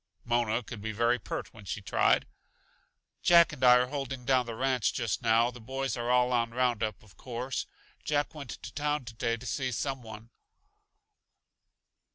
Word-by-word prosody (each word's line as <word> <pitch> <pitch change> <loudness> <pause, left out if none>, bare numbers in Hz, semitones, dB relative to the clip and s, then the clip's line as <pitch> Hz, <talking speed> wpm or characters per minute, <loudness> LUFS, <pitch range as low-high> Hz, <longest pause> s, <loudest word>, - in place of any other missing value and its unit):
Mona 120 0 +1
could 110 -2 -8
be 110 +1 -3
very 120 +3 +2
pert - - -5
when 110 - -13
she 100 - -3
tried. 100 - +2 1.0
"Jack 170 -2 +6
and 130 -3 -7
I 125 -1 +9
are 125 0 +4
holding 135 -3 -4
down 130 -2 +3
the 115 - -5
ranch 130 -2 +1
just 115 -6 -1
now; 115 +1 +3
the 125 -1 -12
boys 135 +1 -3
are 120 0 -3
all 125 0 +4
on 115 -1 +2
roundup, 115 -5 0
of 105 -3 -20
course. 125 +1 -4 0.4
Jack 145 +1 0
went 145 -5 -8
to 120 - -8
town 150 -2 -1
today 115 0 -2
to 120 - -11
see 130 0 -2
some 135 +2 -2
one. 110 0 -11
125 Hz, 175 wpm, -30 LUFS, 115-130 Hz, 1.0 s, I